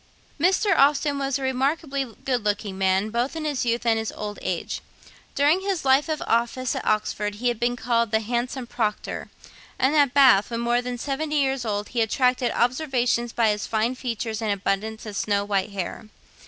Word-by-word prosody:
Mr. 380 +4 +3
Austen 285 0 +3
was 275 -1 0
a 275 - -6
remarkably 275 +2 0 0.2
good 250 -4 0
looking 205 -1 -1
man, 190 +2 +1
both 240 +6 -1
in 320 -1 -4
his 285 -5 -1
youth 235 +1 0
and 225 -1 +3
his 220 - -3
old 210 -1 -6
age. 180 -2 -3 0.5
During 295 +6 +3
his 385 -6 -2
year 265 +1 +5
of 310 -1 -2
office 235 +2 0
at - - -3
Oxford 210 -1 -1
he 245 +4 0
had 235 -2 -3
been 240 0 +1
called 235 -1 0
the 220 +1 +2
'handsome 240 +3 -2
Proctor;' 220 -3 -3 0.5
and 265 +4 +2
at 285 -4 +4
Bath, 260 -8 +6
when 230 -1 -3
more 240 +1 +2
than 245 0 -4
seventy 295 +4 -2
years 270 -3 +1
old, 205 -1 -2
he 240 - 0
attracted 250 +2 +2
observation 245 -2 +1
by 230 -2 +3
his 210 0 -1
fine 225 +3 0
features 230 -3 -4
and 220 -2 0
abundance 200 +3 -2
of 210 -2 -7
snow 200 0 0
white 200 0 0
hair. 195 +1 -5
240 Hz, 190 wpm, -24 LUFS, 215-270 Hz, 0.5 s, Bath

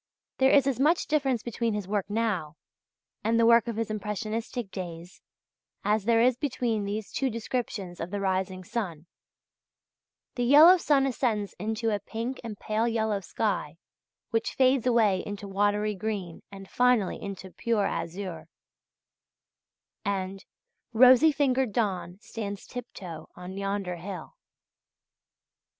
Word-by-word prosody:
There 265 0 +5
is 275 -1 +5
as 270 -3 0
much 310 +5 +3
difference 270 -6 0
between 230 -2 -1
his 205 -3 -4
work 205 -1 -1
now 205 -8 -1 0.7
and 230 +1 +2
the 230 - +5
work 235 0 +6
of 230 - -3
his 225 -1 -2
impressionistic 215 +1 -4
days 175 -1 -7 0.6
as 210 0 +1
there 230 0 +4
is 250 0 +4
between 245 -7 -1
these 210 +1 -4
two 270 - 0
descriptions 220 -6 -4
of 165 - -4
the 205 - -3
rising 190 -1 -1
sun: 190 -8 -4 1.3
(1) - - -52
"The 245 - +1
yellow 310 +8 +8
sun 285 -5 +3
ascends 230 -6 -1
into 220 +3 -1
a 205 - 0
pink 230 +5 -5
and 220 -3 -6
pale 215 +3 0
yellow 220 -3 0
sky - - -2 0.5
which 225 -1 -1
fades 260 -1 +3
away 215 -6 +3
into 205 0 -6
watery 205 +2 +1
green 195 -4 -4
and 195 -1 -10
finally 245 -4 +2
into 195 -1 -7
a - - -23
pure 210 +3 0
azure," 170 -3 -4 1.6
and 195 -1 -2
(2), - - -19 0.5
"Rosy 255 +6 +7
fingered 265 -4 +1
dawn 190 -5 -1
stands 205 -4 -6
tip 245 -1 -7
toe 170 -4 -8
on 180 +1 -8
yonder 195 -2 -2
hill." 180 -1 -7
215 Hz, 145 wpm, -28 LUFS, 195-240 Hz, 1.6 s, yellow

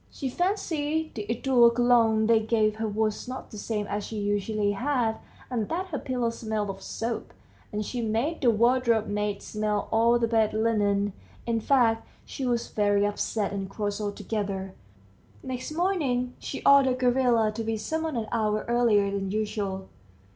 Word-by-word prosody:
She 270 - -4
fancied 320 -3 -1
the 210 -2 -6
eau 240 0 +4
de 235 - -5
Cologne 230 -3 +4
they 225 0 +5
gave 215 -1 +1
her 220 0 -1
was 215 +2 -1
not 255 +1 -7
the 215 - -8
same 210 -1 -2
as 205 0 -3
she 220 - -6
usually 205 0 0
had, 240 0 0 0.3
and 230 -5 -2
that 370 +3 -2
her 295 - -3
pillow 245 -3 -1
smelt 220 -3 -3
of 195 0 -11
soap, 230 +3 -4 0.4
and 210 0 -3
she 245 +2 -3
made 230 +9 -1
the 250 - +4
wardrobe 235 0 +3
maid 205 -1 -2
smell 210 -1 -2
all 230 +2 +4
the 235 -1 +1
bed 220 -2 +2
linen 205 -3 +1 0.3
in 230 -1 0
fact 230 -2 +2 0.2
she 265 - -4
was 235 -1 0
very 205 -1 +2
upset 205 0 -1
and 195 -1 -4
cross 205 +1 -3
altogether. 200 -2 -3 0.7
Next 255 +1 -5
morning 300 -8 0
she - - -6
ordered 275 -2 +6
Gavrila 245 -3 +3
to 225 +1 -4
be 225 0 -1
summoned 315 +5 -2
an 220 -2 -2
hour 215 -2 0
earlier 230 -4 +3
than 195 -1 -2
usual. 200 -2 -2
225 Hz, 170 wpm, -27 LUFS, 210-245 Hz, 0.7 s, ordered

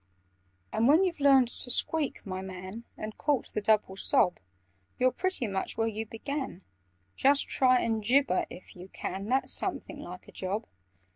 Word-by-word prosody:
"And 230 - +3
when 315 +7 +6
you've 350 -4 -1
learned 270 -4 +5
to 245 - -8
squeak, 295 +4 0
my 185 -1 -4
man, 190 +4 -8
And 215 0 -7
caught 285 -4 0
the 210 - 0
double 210 -2 +2
sob, 180 -2 +2 0.6
You're 255 0 +3
pretty 370 -6 -1
much 195 -3 -3
where 225 - +2
you 220 0 -3
began: 265 - -5 0.5
Just 280 +1 +4
try 255 -1 +4
and 225 -1 0
gibber 250 -3 +3
if 180 - -12
you 180 +1 -10
can! 195 +1 -5
That's 265 +2 +2
something - - -2
like - - -9
a - - -12
job! 200 +4 -3
225 Hz, 165 wpm, -29 LUFS, 195-275 Hz, 0.6 s, when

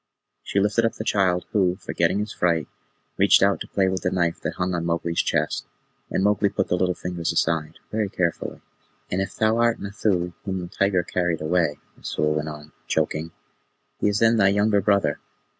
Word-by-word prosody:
She 100 - -1
lifted 105 +3 +2
up 115 - +1
the - - -5
child, 95 -4 +1
who, 95 -4 +2
forgetting 90 -1 0
his 105 +1 -3
fright, 85 -4 +1 0.5
reached - - +5
out - - +3
to - - -5
play 95 -1 +1
with 95 0 -1
the - - +1
knife 85 -2 0
that - - -3
hung 90 0 -1
on 85 -1 -1
Mowgli's 85 0 0
chest, - - -1 0.4
and 95 - 0
Mowgli 105 0 +3
put - - -2
the - - +2
little 90 0 +1
fingers 90 -2 -3
aside 80 -2 0
very 105 -2 0
carefully. 85 -3 -2 0.5
"And 90 - 0
if 95 - -4
thou 110 +1 +2
art 120 -1 +2
Nathoo 100 -4 -1
whom 95 -1 -3
the 90 - -5
tiger 100 -1 +1
carried 90 -2 -1
away," 80 -2 +1 0.2
Messua 75 - -1
went 75 0 -1
on, 75 0 -10 0.2
choking, 80 +1 -1 0.7
"he - - +2
is 100 - 0
then 115 +1 +4
thy 100 -2 +5
younger 100 +1 +3
brother. 100 -7 +2
90 Hz, 190 wpm, -24 LUFS, 85-100 Hz, 0.7 s, reached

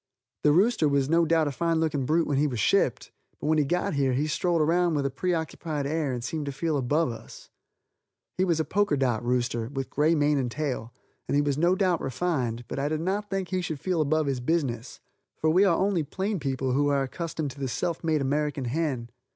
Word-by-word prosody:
The 150 - +4
rooster 190 -1 +3
was 140 -1 +1
no 165 +1 +4
doubt 160 -1 +2
a - - -1
fine 165 +3 0
looking 150 -5 0
brute 165 +2 +2
when 140 -2 0
he 150 - +3
was 125 -5 -3
shipped, - - +1 0.3
but - - -6
when 155 +1 +3
he - - +4
got 175 +6 -1
here 135 -3 +1
he 140 +4 +1
strolled 170 +2 0
around 170 +2 +2
with 140 -1 0
a 140 - 0
preoccupied 160 -1 -2
air 150 -1 -1
and 120 -2 -4
seemed 150 +2 -3
to - - -1
feel 155 +3 -1
above 145 +2 +1
us. 115 - -11 0.8
He 185 - +1
was 170 -4 +1
a 160 - +1
poker 190 -2 +1
dot 125 -4 0
rooster, 120 -2 -1
with 135 -2 -4
gray 155 +3 +3
mane 145 -1 +2
and 125 -2 -1
tail, 130 -4 -3 0.4
and - - 0
he 145 - +4
was 145 -1 0
no 170 +5 +3
doubt 185 -4 +1
refined, 130 -4 -2
but - - -4
I 140 +1 0
did 155 0 -1
not 200 +4 -2
think 195 -2 -2
he 185 -1 -1
should 160 -4 -4
feel 180 -1 0
above 155 +1 +1
his 135 -3 -1
business, 125 -4 -2 0.4
for 155 - +2
we 185 +5 +5
are 170 -4 +3
only 195 -3 +1
plain 190 +6 -2
people 135 -2 -1
who 145 +3 +2
are 140 -1 +2
accustomed 155 +1 -4
to 140 - -13
the 135 - -2
self 165 +7 -2
made 155 -2 +1
American 145 0 -1
hen. 130 -3 -2
150 Hz, 230 wpm, -27 LUFS, 135-165 Hz, 0.8 s, we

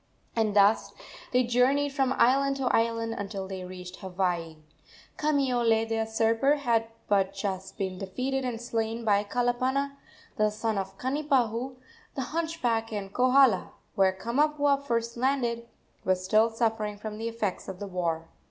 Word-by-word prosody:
And 220 -3 +1
thus 205 +1 +4 0.4
they 250 0 +4
journeyed 265 +4 +2
from 270 -2 +1
island 275 +3 +4
to 260 -2 +1
island 230 0 0
until 200 -1 -5
they 190 -1 -6
reached 180 0 -9
Hawaii. 180 -4 -2 0.6
Kamiole, 245 -7 +2
the 225 0 -1
usurper, 225 +5 +2
had 235 -6 +1 0.2
but 195 -1 +2
just 195 -1 -4
been 190 -2 -3
defeated 255 +8 -2
and 245 -3 -3
slain 230 -1 -2
by 205 -1 +3
Kalapana, 255 +5 0 0.4
the 215 0 +3
son 215 0 -1
of 190 0 -6
Kanipahu, 260 -3 0 0.4
the 270 - -2
hunchback, 310 -10 -1
and 200 -2 -5
Kohala, 255 -5 +4 0.2
where 190 -1 +4
Kamapuaa 285 +7 +1
first 235 -3 -1
landed, 240 -2 0 0.4
was 185 0 0
still 215 +4 +4
suffering 225 -2 -1
from 215 +1 -6
the 225 - -2
effects 225 -4 -3
of 190 - -6
the 205 - -5
war. 170 -4 -2
225 Hz, 145 wpm, -28 LUFS, 200-255 Hz, 0.6 s, thus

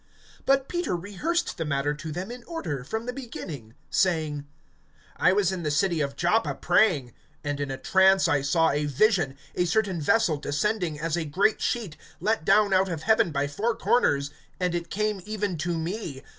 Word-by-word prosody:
(4)But 270 0 +3
Peter 350 - -1
rehearsed 205 - -2
the - - 0
matter 145 -1 0
to 155 +2 -7
them 180 +8 -5
in 245 0 -9
order, 160 - -4
from 220 - -4
the 250 - -3
beginning, 155 - -8 0.2
saying: 155 -6 0 0.7
(5)I 180 +2 +4
was 195 -2 +2
in 185 -2 -3
the 155 - -1
city 165 +2 +1
of 140 -1 -2
Joppa 195 +9 +1
praying; 145 - +2 0.3
and 145 -1 -2
in 140 -1 -2
a 135 - -3
trance 190 +6 +4
I 145 - +2
saw 160 +4 +2
a 145 +1 0
vision, 145 - +2 0.2
a 180 - +1
certain 190 -2 0
vessel 175 -1 +3
descending, 160 +2 -1
as 165 +1 -1
a 170 - -1
great 190 +9 +1
sheet, 210 -11 -2 0.2
let 220 -5 0
down 205 +3 +4
out 190 0 +3
of 160 -3 -4
heaven 220 -6 +3
by 140 -1 0
four 215 +11 -1
corners; 145 - +2 0.3
and 180 -1 0
it 170 -1 -3
came 210 -1 -1
even 205 -2 -2
to 170 +1 -1
me. 165 -5 -4
175 Hz, 185 wpm, -26 LUFS, 150-210 Hz, 0.7 s, 5)I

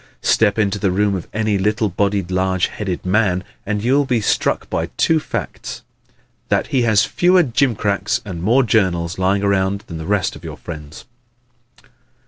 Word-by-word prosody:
Step 105 -2 +3
into 105 -2 +1
the 100 - +1
room 100 +2 +1
of 95 -3 -4
any 105 -2 0
little 105 +3 +1
bodied 100 -1 -1
large 95 0 +1
headed 95 -5 -4
man 95 -1 +1 0.2
and 105 0 -1
you 125 +3 +2
will 145 +1 +4
be 125 -3 +1
struck 105 - 0
by - - -2
two 160 -1 +3
facts - - -6 0.7
that - - +2
he 130 - +3
has 110 -3 +3
fewer 180 0 +3
jimcracks 110 - 0
and 90 -5 -6
more 120 +9 +3
journals 95 -7 +1
lying 95 +2 +1
around 100 0 +1
than 80 -2 -7
the 80 - -6
rest 100 -3 0
of - - -13
your - - -7
friends. 75 -1 -9
100 Hz, 170 wpm, -19 LUFS, 95-110 Hz, 0.7 s, will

